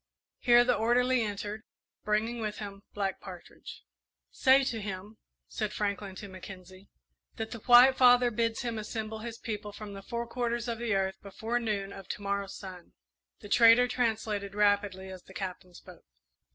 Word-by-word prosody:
Here 240 -1 +6
the 250 0 +2
orderly 245 +2 +2
entered, 210 0 -4 0.4
bringing 225 +3 0
with 210 -1 -3
him 200 -2 -7
Black 195 -2 -2
Partridge. 180 -2 -11 0.5
"Say 270 0 +5
to 230 -4 -2
him," 200 +2 -7 0.3
said 215 -2 -3
Franklin 200 -2 -3
to 200 - -8
Mackenzie, 185 0 -12 0.5
"that 220 0 -5
the 235 - -6
White 250 +3 +7
Father 245 -1 +6
bids 230 0 -1
him 230 -2 -3
assemble 220 0 -5
his 230 +1 -7
people 210 -2 -5
from 205 0 -9
the 195 - -8
four 235 +4 -4
quarters 235 0 -2
of 230 -1 -3
the 235 -4 0
earth 190 0 -1
before 220 +4 -3
noon 205 -4 -2
of 195 -1 -10
to - - -5
morrow's 200 0 -2
sun." 185 -3 -10 0.5
The 205 - -10
trader 230 +3 +6
translated 220 -5 -1
rapidly 205 -2 +1
as 185 -1 -9
the 190 - -17
Captain 185 -2 -6
spoke. 180 0 -14
210 Hz, 165 wpm, -30 LUFS, 195-235 Hz, 0.5 s, White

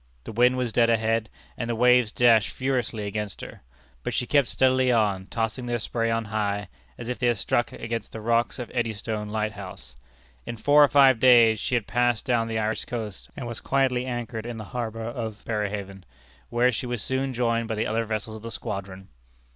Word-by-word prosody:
The - - -7
wind 125 +3 +3
was 125 -2 -1
dead 115 +1 +3
ahead, 115 0 +1 0.3
and 115 - -4
the 120 - 0
waves 125 -1 +4
dashed 115 -4 +4
furiously 125 -5 -2
against 105 0 -4
her; - - -10 0.4
but - - -3
she - - 0
kept 140 0 +3
steadily 130 -1 +3
on, 100 -5 +1
tossing 115 +2 -3
their 120 0 0
spray 115 0 -1
on 115 0 0
high, 105 -2 -2 0.3
as 115 - -7
if 125 - -3
they 125 - +1
had 120 -2 +2
struck 120 +4 0
against 115 -2 -5
the 110 - -7
rocks 115 +2 +1
of 125 - -6
Eddystone 110 -2 -2
lighthouse. 105 -3 -5 0.5
In 115 - -6
four 145 +5 +5
or - - +6
five 135 -3 +5
days 115 -3 +6
she 125 - -1
had 115 -4 0
passed 120 -2 +1
down 120 -3 +1
the 110 -1 -2
Irish 110 0 -1
coast, 110 -5 -6
and 135 - -5
was 120 -1 -5
quietly 130 -2 +1
anchored 120 -2 -4
in 120 -1 -5
the 110 - -6
harbor 115 -2 -3
at 115 -3 -6
Berehaven, 100 -3 -3 0.5
where 120 +2 +3
she 125 +1 -3
was 120 -3 -3
soon 130 +1 -1
joined 115 -2 0
by 110 - -2
the 110 - -1
other 115 +1 -1
vessels 110 0 -3
of - - -12
the 115 - -6
squadron. 100 -4 -6
115 Hz, 205 wpm, -25 LUFS, 110-125 Hz, 0.5 s, or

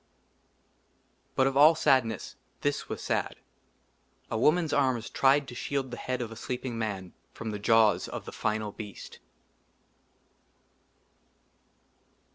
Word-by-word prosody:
BUT 130 - +4
OF 135 0 +1
ALL 150 +4 +7
SADNESS 125 - +1 0.3
THIS 145 0 -1
WAS - - -5
SAD, - - -1 1.0
A - - 0
woman's 160 +5 +3
arms 130 -5 +1
tried 140 +1 +3
TO 125 - -8
SHIELD 135 +1 -3
THE 120 - -5
HEAD 125 0 -2
OF 115 - -7
A - - -8
SLEEPING 125 +1 -4
MAN 100 -5 -4 0.2
FROM 110 - -5
THE 105 - -4
JAWS 110 0 +4
OF - - -6
THE - - -7
FINAL 105 -1 -2
BEAST. 105 -2 -9
125 Hz, 125 wpm, -29 LUFS, 110-135 Hz, 1.0 s, ALL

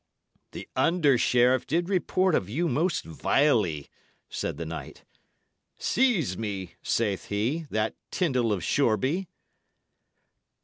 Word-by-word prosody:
"The - - -8
under 160 -6 +3
sheriff 125 +1 +3
did 170 +4 0
report 185 -1 +1
of 95 -9 0
you 165 +10 0
most 165 +2 0
vilely," 90 - +1 0.4
said - - -3
the 85 - -4
knight. 80 -4 -8 0.7
"'Seize 195 - +1
me,' 100 -5 -4
saith 105 -4 -1
he, 125 +11 -2
'that 110 0 -1
Tyndal 130 - 0
of 95 -5 -1
Shoreby.'" 140 - +1
125 Hz, 115 wpm, -27 LUFS, 100-165 Hz, 0.7 s, under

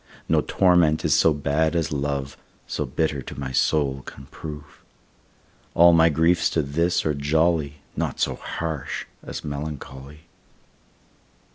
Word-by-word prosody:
No - - +3
torment 90 -4 +3
is - - +3
so 80 - +5
bad 75 +3 0
as 80 -1 0
love, 70 -1 -2 0.3
So - - -3
bitter 75 -4 -1
to 65 - -9
my 65 -1 -4
soul 70 0 +1
can 65 - -11
prove. 75 -2 -9 0.9
All 85 +1 +7
my 80 0 +6
griefs 80 +3 +2
to 80 - +3
this 85 +5 0
are 75 - +1
jolly, 75 +1 +1 0.2
Naught - - -3
so - - +1
harsh 80 -5 -4 0.2
as - - -7
melancholy. 70 -1 -7
75 Hz, 135 wpm, -24 LUFS, 70-80 Hz, 0.9 s, All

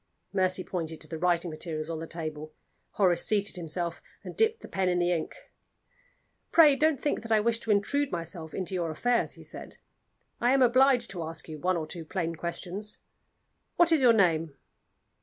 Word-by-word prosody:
Mercy 185 -1 +1
pointed 165 -4 -4
to 155 - -10
the 160 +1 -6
writing 175 0 +1
materials 155 0 -5
on 165 -1 -4
the 165 - -6
table. 155 -2 -5 0.4
Horace 185 -4 +2
seated 205 -2 +1
himself, 170 0 -3 0.2
and - - -8
dipped 445 0 +2
the - - -9
pen 190 -1 0
in 180 - +1
the 175 0 +2
ink. 165 -3 -2 1.2
"Pray 305 -4 +7
don't 310 -1 +2
think 295 - -1
that 230 - -8
I 220 - +5
wish 230 +1 +1
to 225 - -9
intrude 240 +8 +1
myself 165 -2 -4
into 190 0 -3
your 175 -3 -1
affairs," 240 +10 0
he - - -13
said. - - -10 0.6
"I 245 +2 +3
am 270 -1 +5
obliged 255 0 +4
to 180 -3 -5
ask 160 0 -7
you 155 -2 -7
one 180 +2 +1
or 160 - -3
two 165 +1 -5
plain 165 0 -3
questions. 180 +5 -5 0.8
What 345 -1 +4
is 320 -4 +4
your 250 -2 +7
name?" 165 -7 +2
180 Hz, 190 wpm, -28 LUFS, 165-230 Hz, 1.2 s, Pray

